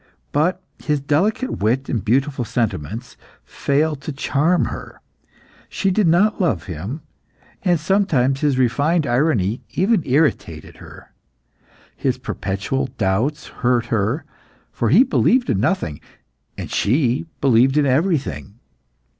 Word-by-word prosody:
But 180 +6 0 0.2
his 150 -2 0
delicate 185 - 0
wit 125 +6 +1
and 115 -7 -2
beautiful 135 +4 +1
sentiments 115 - -3 0.3
failed 150 +1 -1
to 155 - -5
charm 150 +5 +1
her. - - -8 0.7
She 195 - 0
did 200 0 +2
not 195 +6 +3
love 105 - +1
him 95 - -6 0.6
and 175 -3 +2
sometimes 150 -7 +1
his 145 -3 +1
refined 145 +6 +2
irony 120 - +1
even 200 +1 +2
irritated 130 - -1
her. - - -14 0.8
His - - -1
perpetual 100 +8 -3
doubts 110 +8 0 0.2
hurt 120 -1 +2
her, 115 - 0 0.5
for 115 - -1
he 190 - +7
believed 255 -2 +2
in 100 - 0
nothing, 110 - -1 0.6
and - - -6
she 130 +6 +1
believed 130 +1 +3
in 150 - +4
everything. 135 - 0
135 Hz, 120 wpm, -20 LUFS, 115-160 Hz, 0.8 s, he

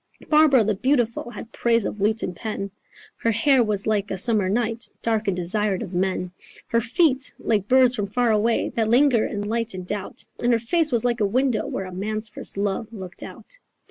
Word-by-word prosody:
"Barbara 300 -6 +5
the 215 +1 +1
beautiful 240 +1 0
Had 240 - -9
praise 230 -3 +1
of 210 - -4
lute 215 +2 +2
and 180 - -3
pen: 200 -1 -5 0.5
Her 230 - 0
hair 245 +3 +3
was 210 -3 -2
like 210 -2 0
a 190 - -3
summer 210 -2 +1
night 230 +2 -1
Dark 220 -2 0
and 190 -2 0
desired 195 +3 -1
of 190 -4 -8
men. 180 0 -1 0.4
Her 230 - +2
feet 265 +2 +2
like 210 -3 0
birds 255 0 +5
from 205 -4 -2
far 240 +3 +1
away 220 +2 +1
That 220 -2 -1
linger 245 -1 +4
and 205 -1 -4
light 230 -1 -2
in 185 - -5
doubt; 195 +2 -4 0.2
And 240 0 +3
her - - +4
face 305 +7 0
was 235 -1 +1
like 240 -1 +1
a - - +4
window 250 +2 0
Where 195 - -4
a 185 - -8
man's 215 +3 -3
first 210 - -3
love 205 +2 -2
looked 190 -5 -9
out. - - -11
220 Hz, 205 wpm, -23 LUFS, 200-240 Hz, 0.5 s, Barbara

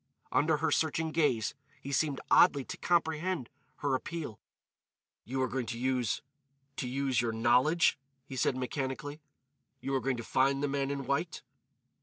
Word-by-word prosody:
Under 155 0 +3
her 160 +1 0
searching 160 +1 +1
gaze 145 - +1 0.3
he 140 - -7
seemed 140 -1 +1
oddly 140 -7 +6
to - - -5
comprehend 165 -4 0 0.3
her 145 -2 +1
appeal. 145 -4 -3 0.9
"You 130 +3 -1
are - - +1
going 125 -2 -3
to 115 - -4
use—to 135 +2 -3
use 130 -1 +1
your 120 -1 0
knowledge," 125 +9 +3 0.3
he 135 - -8
said 130 0 +1
mechanically. 135 +3 -3 0.6
"You 135 - -3
are 135 - +2
going 135 -2 0
to 115 - -5
find 135 +4 +2
the - - +2
man 140 -1 -1
in 140 -1 -3
white." 140 +6 -1
135 Hz, 155 wpm, -31 LUFS, 130-150 Hz, 0.9 s, oddly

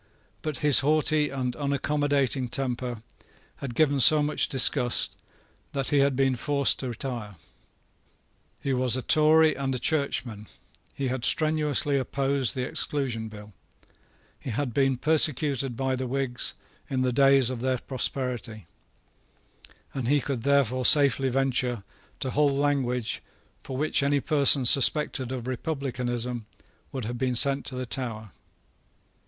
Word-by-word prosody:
But 155 -4 -4
his 145 -3 +8
haughty 150 +1 +1
and 125 -2 -3
unaccommodating 140 -2 -1
temper 125 -3 -3 0.5
had 130 -4 -7
given 145 -1 +2
so 150 +3 +6
much 150 +1 +1
disgust 125 -2 +1 0.6
that 135 -2 -2
he 145 - +2
had 140 -1 +2
been 135 0 +1
forced 140 +2 +1
to 130 - -4
retire. 120 -4 -6 1.2
He 135 - -2
was 125 -1 +2
a 130 - -5
Tory 155 +1 +4
and 135 -1 -3
a - - -2
Churchman: 125 -6 -2 0.5
he 135 -2 -2
had 130 -1 -4
strenuously 150 -2 +1
opposed 135 0 0
the 130 - -2
Exclusion 125 -6 -3
Bill: 105 -1 -12 0.9
he - - -8
had 125 +1 -3
been 135 -1 +1
persecuted 140 -4 +1
by 130 -1 -1
the 130 0 -4
Whigs 130 -1 -2 0.3
in 130 -1 -1
the 125 -1 0
day 135 +1 +5
of 130 -2 0
their 130 0 0
prosperity; 125 - -3 1.3
and 130 -4 -4
he 145 +3 +3
could 135 -2 -4
therefore 130 -2 +1
safely 135 -1 +5
venture 125 -3 -1 0.4
to 130 - -2
hold 145 0 +2
language 135 -5 -1 0.4
for 130 - -7
which 155 +1 +1
any 140 +1 +1
person 140 -2 +3
suspected 135 0 +2
of 125 -3 -5
republicanism 125 -4 -3 0.4
would 130 -5 -5
have 120 +2 -5
been 130 -1 -1
sent 140 +3 +3
to 130 - -7
the 130 0 -4
Tower. 115 -4 -5
135 Hz, 140 wpm, -26 LUFS, 125-140 Hz, 1.3 s, his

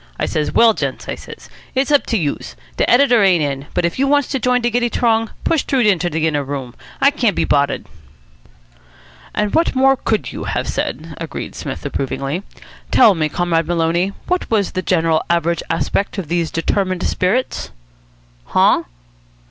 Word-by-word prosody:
I - - +1
says, 150 -1 -1
'Well, 230 -1 +5
gents,' - - -4
I - - -2
says, - - -11 0.3
'it's 270 +3 +1
up 290 - +3
to 230 - +1
youse. 150 -7 -3 0.2
De - - +1
editor 245 -2 +5
ain't 180 -5 +4
in, 140 0 -3
but 175 - +2
if 170 - -2
youse 275 0 +2
wants 285 -2 +3
to 270 - -1
join 250 +1 +2
de 240 0 0
giddy 240 +1 +1
t'rong, 225 -2 +1
push 325 -4 +2
t'roo 270 - 0
inter 185 -6 +2
de 160 -1 -1
inner 150 -3 0
room. 135 -3 -5 0.3
I 275 - +5
can't 235 - +1
be - - +1
boddered.'" 140 -1 +1 1.5
"And 210 -1 0
what 330 -3 +2
more 270 +1 +4
could 225 -4 -2
you - - -6
have - - -2
said?" 160 +5 -3
agreed 165 -1 -6
Psmith - - -6
approvingly. 140 +5 -3 0.5
"Tell 215 - +6
me, 155 -3 -1
Comrade 165 -1 0
Maloney, 170 +2 +1
what 360 0 -1
was 210 -4 +1
the 185 - -2
general 165 -2 +1
average 170 0 +1
aspect 165 +6 -1
of 180 -6 -4
these 170 -1 0
determined 185 +2 -1
spirits?" 215 +8 -1 0.8
"Huh?" - - +3
185 Hz, 180 wpm, -18 LUFS, 160-240 Hz, 1.5 s, Tell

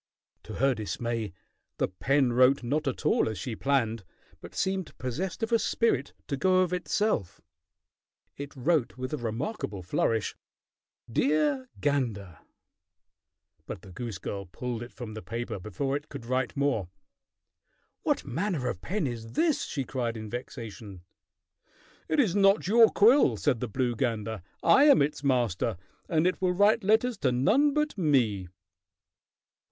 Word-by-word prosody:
To - - -8
her 135 +1 +3
dismay 110 0 -3 0.5
the - - +1
pen 135 +6 +1
wrote 130 +2 +4
not 145 +5 -1
at 135 - -3
all - - +3
as 110 - -5
she 110 +5 -4
planned, 115 -5 0 0.4
but 90 +2 -11
seemed 190 -2 -2
possessed 165 - -4
of 225 - -1
a 230 - +4
spirit 180 - 0
to 140 - -1
go 185 +5 +3
of 180 -1 0
itself. 180 - -1 1.0
It 140 0 -8
wrote 130 - 0
with 130 +1 -4
a - - 0
remarkable 115 - -4
flourish: 110 +4 0 0.7
"Dear 140 +1 +1
gander!" 110 - -1 1.3
But 90 - -7
the 95 - -12
goose 110 +1 -5
girl 100 +1 -5
pulled 120 +5 -5
it 120 - -8
from 115 -3 -8
the 110 - -7
paper 115 -2 -5
before 110 +9 -2
it 145 +2 -5
could 135 -4 -8
write 130 +3 -1
more. 140 -10 0 1.1
"What - - 0
manner 165 - -2
of 90 -7 -5
pen 185 - -2
is 115 -3 -5
this?" 325 -4 +1
she 140 - -3
cried 120 -3 -3
in 110 -1 -7
vexation. 115 -6 -7 1.1
"It 310 - +1
is 210 -10 +3
not 195 0 +4
your 225 +2 +7
quill," 240 +8 +5
said 135 -6 +1
the 125 - -2
blue 120 +1 -1
gander. 110 -3 -2 0.2
"I 280 - +6
am 290 - +7
its 145 0 -3
master, 120 -6 +1 0.3
and 160 -1 +2
it 185 - 0
will 180 -1 +2
write 205 +4 +4
letters 220 +4 +2
to 130 - +2
none 250 - +3
but 300 0 0
me." 120 - +2
130 Hz, 155 wpm, -28 LUFS, 115-175 Hz, 1.3 s, your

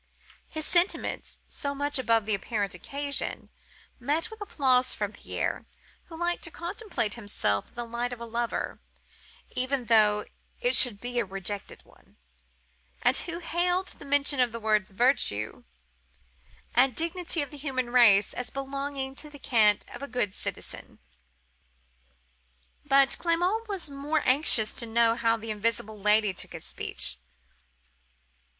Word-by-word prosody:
His 315 -1 -5
sentiments 355 +2 0
(so 280 0 -4
much 285 0 0
above 230 -4 +2
the 215 - 0
apparent 200 -1 -2
occasion) 280 +9 -4 0.5
met 300 - -1
with 440 -1 -11
applause 265 - +2
from - - -2
Pierre, - - -3 0.4
who 330 - -10
liked 345 +1 -1
to - - -6
contemplate 340 - -3
himself 205 - -1
in - - -28
the 240 - -3
light 235 +1 -3
of 245 - -6
a 235 - -6
lover, 235 +1 -3 0.7
even 255 0 -1
though 210 -2 +4 0.3
it - - +3
should 235 -6 +6
be 245 +1 -2
a - - +1
rejected 195 +1 -5
one, - - -24 0.9
and - - +4
who 340 -1 -2
hailed 355 +2 0
the - - -13
mention 285 0 +2
of 250 -2 +3
the 230 - -5
words 215 -3 +1
'virtues' 195 - +1 1.1
and 250 0 +4
'dignity 335 -1 0
of 285 - -9
the 295 - -9
human 260 -4 -2
race' 220 -5 +6
as 250 0 -4
belonging 275 0 -4
to 300 +2 -5
the 290 - -11
cant 215 -6 +3
of - - -9
a 280 - -4
good 230 -6 -1
citizen. - - -6 1.9
"But 275 -1 +5
Clement 355 +7 +1
was 390 -6 -2
more 290 +2 -1
anxious 255 -5 +4
to 235 - 0
know 230 0 +4
how 230 -1 +2
the 225 0 -5
invisible 215 0 -2
Lady 210 -1 +3
took - - -6
his - - -8
speech. 60 - -3
255 Hz, 145 wpm, -28 LUFS, 220-295 Hz, 1.9 s, should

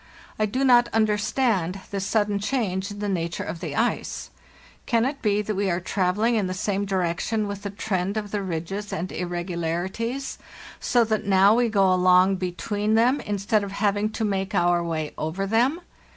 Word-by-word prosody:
I 215 - +2
do 255 +6 -1
not 245 -2 +5
understand 210 -3 +1
this 195 -1 -2
sudden 205 -2 +1
change 200 -4 -1
in 205 - -8
the 205 0 -3
nature 170 -3 -2
of 170 - -5
the 160 -5 -5
ice. 240 - -1 0.6
Can 230 -1 +2
it 275 +1 -3
be 210 -1 +1
that 215 - -2
we 200 0 0
are 175 0 0
travelling 195 +5 +1
in 210 -4 +1
the 185 - -3
same 200 +1 -1
di 195 -1 -2
rection 185 +5 0
with 200 -1 -5
the 200 - -4
trend 200 -1 -2
of 205 -2 -4
the 205 - -1
ridges 190 +3 -4
and 175 +3 -3
irregularities, 175 +8 -3 0.4
so 240 -2 +3
that 215 -1 -1
now 195 +1 +6
we 240 0 +2
go 195 -3 +3
along 185 +1 +4
between 205 +4 -1
them 245 +5 +3
instead 205 +1 0
of 200 -1 -6
having 205 +1 +1
to 220 - -1
make 195 -1 -1
our 175 -1 +3
way 160 -3 -3
over 160 +6 -2
them? 240 - +2
200 Hz, 185 wpm, -24 LUFS, 185-215 Hz, 0.6 s, now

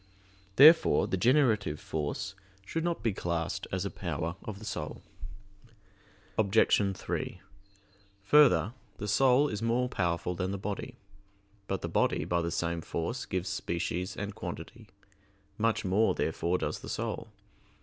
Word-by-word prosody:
Therefore 155 +7 +7
the - - -1
generative 110 - +2
force 80 +5 -3 0.3
should 165 +10 -2
not 170 -9 -2
be 115 -3 +1
classed 90 +1 -2
as 95 +1 -1
a 100 - -3
power 85 -1 -3
of 105 -2 -6
the 110 - -10
soul. 75 -7 -5 1.4
Obj. 100 -2 +3
3: - - -4 0.8
Further, 135 -1 +5 0.2
the 105 - -5
soul 130 +6 +4
is 105 -5 -4
more 120 +2 +1
powerful 85 -5 -1
than 90 +1 -2
the 100 - -2
body. 100 +1 -5 0.7
But 95 - -2
the - - -1
body - - +1
by 85 0 +1
the 85 - -1
same 85 0 -2
force 100 +11 -4
gives 95 -1 -2
species 85 +2 -3
and 100 0 -4
quantity; - - -8 0.7
much 115 -1 +1
more, 100 +4 +3
therefore, 85 +2 0
does - - -3
the - - -9
soul. - - -3
95 Hz, 140 wpm, -30 LUFS, 85-115 Hz, 1.4 s, Therefore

